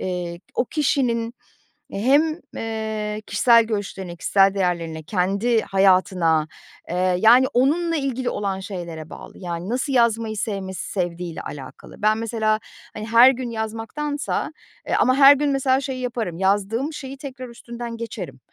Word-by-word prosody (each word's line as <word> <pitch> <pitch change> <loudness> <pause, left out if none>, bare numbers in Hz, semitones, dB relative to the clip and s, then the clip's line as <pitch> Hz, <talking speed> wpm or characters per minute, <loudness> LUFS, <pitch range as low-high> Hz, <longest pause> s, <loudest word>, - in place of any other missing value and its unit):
eee, 175 -2 -4
o - - +1
kişinin 245 -5 0 0.6
hem, 290 - +2 0.2
eee, 220 -1 -3
kişisel 230 +3 +5
görüşlerine, 200 -5 -4
kişisel 195 +3 +3
değerlerine, 170 -4 -2
kendi 200 +7 +1
hayatına, 185 -5 +2 0.4
eee, 180 +1 +1
yani, 240 +5 +7
onunla 330 +7 +2
ilgili 265 -4 -1
olan 200 -2 -2
şeylere 170 -5 -7
bağlı, - - -11
yani, 175 0 -5
nasıl 260 +4 -1
yazmayı 230 -3 +2
sevmesi, 195 -4 -4
sevdiğiyle 175 -2 -3
alakalı. 135 +6 -10
Ben 215 +1 +3
mesela, 220 -1 0 0.3
hani, 215 - -6
her 230 +3 +8
gün 255 -1 -5
yazmaktansa 225 +7 -3 0.3
eee, - - +1
ama 255 - +4
her 275 +1 +8
gün 290 +1 0
mesela 270 -1 +2
şeyi 265 -2 -4
yaparım, 230 -9 -3
yazdığım 205 - 0
şeyi 275 -2 -7
tekrar 265 -2 -8
üstünden 235 0 -8
geçerim. 185 - -7
220 Hz, 135 wpm, -22 LUFS, 190-255 Hz, 0.6 s, her